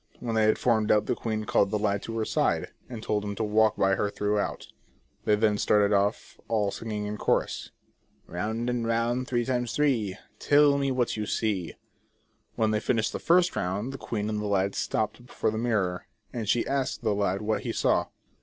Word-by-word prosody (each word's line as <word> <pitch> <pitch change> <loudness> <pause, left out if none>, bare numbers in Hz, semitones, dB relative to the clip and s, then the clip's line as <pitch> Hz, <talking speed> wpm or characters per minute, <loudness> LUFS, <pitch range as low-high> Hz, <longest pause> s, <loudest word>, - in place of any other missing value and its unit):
When 120 -2 -3
they 110 -1 +3
had 110 - +3
formed 110 -3 +2
up 105 -1 +4
the - - 0
queen 110 -2 -3
called 100 - +2
the 105 - 0
lad 100 -1 0
to 115 0 -5
her 110 - 0
side, - - 0 0.2
and 115 -3 -7
told 105 -1 0
him 100 0 -4
to 110 - -2
walk 110 0 +3
by 95 0 +3
her 100 +1 0
throughout. 105 0 -1 0.6
They 105 - +4
then 105 -1 +2
started 105 0 +3
off, 100 +2 0
all 105 -3 +1
singing 105 -1 -4
in 105 +1 -4
chorus: - - 0 0.3
" - - -47 0.2
Round 110 +6 -3
and 120 -2 -1
round 120 +2 0
three 120 -1 0
times 125 -2 -1
three, 115 -10 +1 0.2
Tell 145 -1 +4
me 140 -1 0
what 125 -3 0
you 105 -1 -3
see" 100 -6 -1 0.8
When 110 -1 +1
they 105 - +1
finished 110 -1 0
the - - -3
first 180 +1 +3
round, 100 +8 -2
the 135 - -7
queen 105 -2 -3
and 105 -1 -2
lad 100 -1 0
stopped 110 +2 -2
before - - -1
the 110 - -3
mirror, 100 -7 -1 0.3
and 115 -4 -3
she 115 +2 +2
asked 135 -3 -2
the 110 -2 +2
lad 100 0 0
what 110 +1 0
he - - -3
saw - - +1
110 Hz, 205 wpm, -27 LUFS, 105-120 Hz, 0.8 s, up